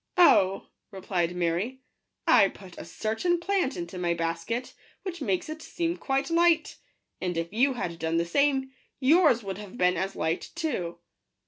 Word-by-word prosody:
" - - -33
Oh," 195 - +5 0.2
replied 180 -3 -2
Mary, 180 +10 -1 0.2
" - - -51
I 195 - +7
put 190 -2 -12
a - - -7
certain 220 - -1
plant 360 -5 0
into 175 +1 -6
my 170 -1 0
basket, 165 +9 -3 0.3
which 350 -4 -5
makes 195 -8 -1
it 310 +1 -7
seem 340 +1 -2
quite 275 +1 -1
light; 335 -1 +3 0.4
and 180 -2 -2
if 165 +3 -3
you 265 +5 +3
had 170 -9 -4
done 160 +1 0
the 170 - +1
same, 270 +6 +1 0.3
yours 290 -3 +4
would 195 -1 -5
have 205 +2 -10
been 180 0 +3
as 190 +3 -2
light 160 +2 -2
too." 285 - -2
210 Hz, 175 wpm, -27 LUFS, 175-290 Hz, 0.4 s, I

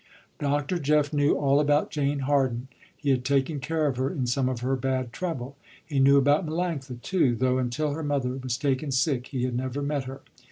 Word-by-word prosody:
Dr. 145 +4 0
Jeff 150 0 +2
knew 145 0 +3
all 140 0 +3
about 145 0 +2
Jane 145 -1 0
Harden. 130 -3 0 0.3
He 145 -2 0
had 125 -2 +1
taken 140 +2 +1
care 155 +3 -1
of 135 -4 0
her 130 +1 0
in 140 -7 -2
some 125 +1 +1
of 125 -2 -4
her 130 +2 0
bad 130 -2 -2
trouble. 140 -7 -4 0.3
He 145 -2 -1
knew 140 +1 +6
about 145 +4 +4
Melanctha 155 -6 -3
too, 145 -11 +2
though 130 +1 +1
until 130 +5 -1
her 155 +3 -4
mother 140 -4 -1
was 130 -2 -3
taken 140 +1 -1
sick 130 -1 +1
he 130 -3 -3
had 125 -1 -1
never 130 +3 -2
met 140 -2 -1
her. 135 +1 -8
140 Hz, 205 wpm, -26 LUFS, 130-145 Hz, 0.3 s, knew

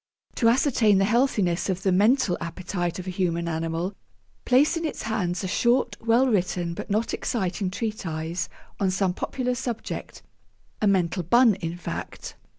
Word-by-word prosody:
To 230 - +4
ascertain 230 -5 +3
the 195 - +3
healthiness 205 -7 +1
of 190 0 -2
the 190 - +2
mental 205 0 +3
appetite 175 0 -3
of 185 - -6
a 185 - -3
human 170 -2 -1
animal, 165 +3 -2 0.5
place 280 +6 +4
in 330 - -2
its 315 - -3
hands 200 -5 -1
a - - -1
short, 235 +3 +2
well 230 +3 +3
written, 180 -6 0
but 170 - -7
not 215 +3 0
exciting 190 -3 -1
treatise 170 -5 -3 0.3
on 195 - +2
some 185 0 +1
popular 250 +6 -2
subject 245 -2 -5 0.6
a 210 - +3
mental 185 -2 +2
bun, 235 +7 +5
in 175 -3 -5
fact. 175 - -6
195 Hz, 155 wpm, -25 LUFS, 175-230 Hz, 0.6 s, bun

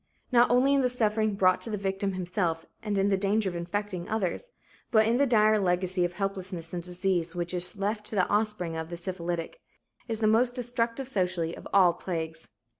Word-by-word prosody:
Not 245 -1 +5
only 255 +3 +4
in 280 - +3
the 250 - +2
suffering 215 -3 +1
brought 185 -2 +3
to - - -3
the 210 - -2
victim 195 0 -2
himself 175 -2 -2 0.2
and 210 -3 -2
in 195 +1 +2
the 195 - +2
danger 205 +1 +1
of - - -8
infecting 180 +1 -4
others, 220 - -2 0.4
but 220 -1 +4
in 230 +2 +2
the 280 +1 +3
dire 215 -2 +4
legacy 180 -1 +1
of 175 0 -1
helplessness 190 -3 -4
and 175 - -2
disease 180 -1 -1
which 175 0 -3
is 180 +2 0
left 210 +2 -2
to - - -4
the 185 -2 +3
offspring 210 -5 0
of 160 0 -4
the 170 - -6
syphilitic, 175 - -4 0.5
is 225 -2 0
this - - -9
the 215 - +3
most 245 +2 +3
destructive 245 +1 -2
socially, 180 -7 -1
of - - -10
all 185 -3 +5
"plagues." 160 -2 -5
195 Hz, 205 wpm, -28 LUFS, 175-220 Hz, 0.5 s, Not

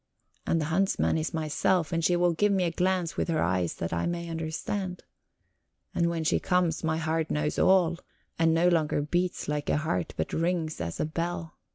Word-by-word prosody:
And 165 - +2
the 155 - -1
huntsman 195 -1 +2
is 160 0 -1
myself, 160 +2 0
and 165 0 0
she 175 - +3
will 175 0 +3
give 205 +5 +2
me 190 -2 +2
a 170 - 0
glance 180 -1 0
of - - 0
her 165 -2 0
eyes 90 -1 0
that 85 - -4
I 85 - 0
may 170 0 -3
understand. 170 +4 -3 0.9
And 170 -1 +2
when 165 -1 -2
she 155 - +2
comes, 180 -3 +1
my 160 0 +1
heart 160 0 -1
knows 150 0 -1
all, 175 -3 +4 0.4
and 165 0 +4
no 165 +2 +3
longer 155 -4 +2
beats 175 +4 -1
like 150 -1 -2
a - - +2
heart, 120 - -2
but 80 - -2
rings 165 - -1
as 85 0 -4
a - - +1
bell. 165 +1 -4
165 Hz, 200 wpm, -28 LUFS, 155-175 Hz, 0.9 s, all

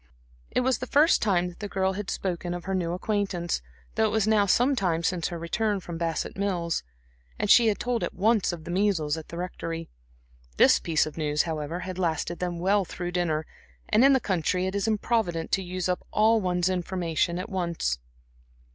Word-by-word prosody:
It - - +1
was 255 -1 +1
the 255 - -5
first 305 +6 +4
time 180 -4 +2
that 175 - -14
the 205 - -4
girl 190 -1 0
had 200 +1 -5
spoken 175 -1 -3
of 175 - -6
her 190 - -2
new 175 -2 -1
acquaintance, 185 -3 -1 0.3
though 220 - +2
it - - +2
was 220 -2 +2
now 210 -2 +4
some 250 +8 +3
time 170 -7 0
since 175 -1 0
her 175 - -5
return 205 +5 -1
from 170 -2 -7
Bassett 165 -2 -2
Mills, 180 -4 -1 0.6
and 210 - +1
she 235 -2 +7
had 210 - +2
told 245 -1 -1
at - - -3
once 215 +1 +2
of 170 -2 -7
the 175 - -6
measles 180 -6 +1
at 160 -1 -8
the 170 - -8
Rectory. 165 -2 -5 0.7
This - - +6
piece 160 -3 +1
of 155 - -8
news, 150 -1 +1
however, 160 +1 -4
had 185 0 -6
lasted 170 0 -1
them 180 -1 -2
well 195 +3 +2
through 175 0 -5
dinner, 160 -3 0 0.4
and 215 +3 +4
in 275 +1 +7
the 265 - +4
country 180 -3 0
it 190 - -2
is 200 +2 -1
improvident 215 -6 0
to 195 - +2
use 185 0 -3
up 180 0 -1
all 220 +1 +3
one's 180 -1 +1
information 175 -2 -1
at 185 - -4
once. 170 - -1
180 Hz, 205 wpm, -27 LUFS, 170-205 Hz, 0.7 s, she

